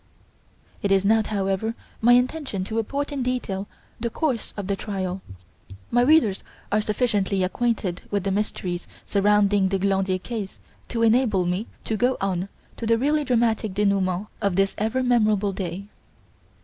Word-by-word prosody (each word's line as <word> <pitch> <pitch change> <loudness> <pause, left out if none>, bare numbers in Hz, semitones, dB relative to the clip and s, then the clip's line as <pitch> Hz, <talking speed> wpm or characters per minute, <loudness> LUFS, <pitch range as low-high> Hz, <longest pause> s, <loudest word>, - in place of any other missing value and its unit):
It 200 - 0
is 195 0 +4
not, 220 +1 +3
however, 200 +2 -1 0.3
my 240 +2 +6
intention 250 -5 +1
to 220 +4 -5
report 280 +7 -1
in 280 -2 -2
detail 235 -6 -2 0.3
the 235 +1 -1
course 255 -2 -1
of 200 - -3
the 200 +1 0
trial. 190 -2 -4 0.7
My 240 - +4
readers 250 -7 +4 0.3
are 210 +1 +3
sufficiently 210 -3 0
acquainted 190 -2 -1
with 200 -2 -1
the 195 - 0
mysteries 185 -3 -2 0.2
surrounding 205 -1 +3
the 195 - +1
Glandier 190 -1 +1
case 205 0 -5 0.3
to 230 -1 0
enable 225 -5 +3
me 180 +5 -1 0.2
to 220 - -2
go 250 +4 +2
on 190 -1 -1 0.3
to 230 - -4
the 230 0 +4
really 295 +5 +2
dramatic 230 -5 +1
denouement 200 -2 +1 0.2
of 200 -3 +1
this 195 +1 +2
ever 225 +5 0
memorable 215 -5 +2
day. 185 0 -4
210 Hz, 155 wpm, -24 LUFS, 195-235 Hz, 0.7 s, my